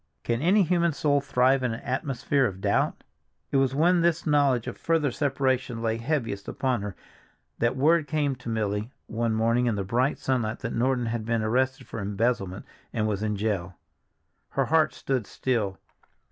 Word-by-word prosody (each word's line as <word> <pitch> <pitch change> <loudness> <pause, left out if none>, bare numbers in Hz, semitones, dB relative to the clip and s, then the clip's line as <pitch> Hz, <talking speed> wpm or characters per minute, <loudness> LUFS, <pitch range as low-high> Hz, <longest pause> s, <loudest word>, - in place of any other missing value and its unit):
Can 115 +1 -1
any 190 +6 +4
human 170 -1 +2
soul 145 -1 +2
thrive 130 -1 +3
in 125 -3 -1
an - - -7
atmosphere 135 +1 0
of 95 -1 -6
doubt? - - 0 0.5
It - - +2
was 135 -1 +2
when 170 +4 +4
this 165 -1 +1
knowledge 140 -6 +3
of - - -5
further 160 -4 +1
separation 130 -3 0
lay 110 0 0
heaviest 115 -6 -2
upon 130 -5 -1
her, 100 -2 -5 0.6
that 120 +2 +1
word 155 +3 +3
came 150 -3 0
to 125 -1 -7
Milly 105 0 -1 0.2
one 115 0 -1
morning 115 +2 +2
in 115 - +1
the 100 - -2
bright 125 +8 +1
sunlight 120 -4 -1
that 115 - -3
Norton 125 +1 +1
had 115 -1 -2
been 115 0 0
arrested 130 +4 0
for - - -7
embezzlement 100 -1 -1 0.3
and 110 -1 0
was 105 -2 -1
in 105 -1 -1
jail. 100 -4 -2 0.7
Her - - 0
heart 160 0 +2
stood 130 -6 -2
still. 110 -7 -1
125 Hz, 175 wpm, -26 LUFS, 110-140 Hz, 0.7 s, any